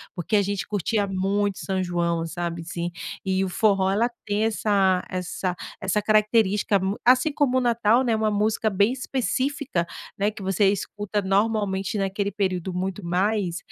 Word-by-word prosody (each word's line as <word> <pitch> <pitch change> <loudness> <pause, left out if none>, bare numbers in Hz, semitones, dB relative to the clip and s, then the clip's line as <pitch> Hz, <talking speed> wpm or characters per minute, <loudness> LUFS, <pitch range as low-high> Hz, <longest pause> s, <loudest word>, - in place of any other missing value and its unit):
porque 185 +4 0
a 205 - +4
gente 200 +1 -2
curtia 205 +1 0
muito 195 +1 -1
São 190 -1 -1
João, 170 -2 -1
sabe 170 0 -4
assim, 170 +1 -4 0.3
e 190 0 +1
o 190 - -2
forró 195 -1 +2
ela 225 +5 +2 0.2
tem 210 0 0
essa 200 -4 +2
essa 185 0 -3 0.3
essa 195 +2 0
característica 210 -1 +3
mu 190 +2 -2
assim 255 +5 +4
como 270 -4 +2
o - - +2
Natal, 235 0 +3
né, 230 -2 +2
uma 215 0 +1
música 215 +1 +1
bem 200 +4 +2
específica, 265 - -1 0.3
né, 205 +2 +1
que 215 - -11
você 195 +1 +2
escuta 205 +1 -3
normalmente 195 -1 0
naquele 200 +1 -1
período 185 -3 -2
muito 185 +2 -3
mais. 185 0 0
200 Hz, 160 wpm, -24 LUFS, 185-215 Hz, 0.3 s, a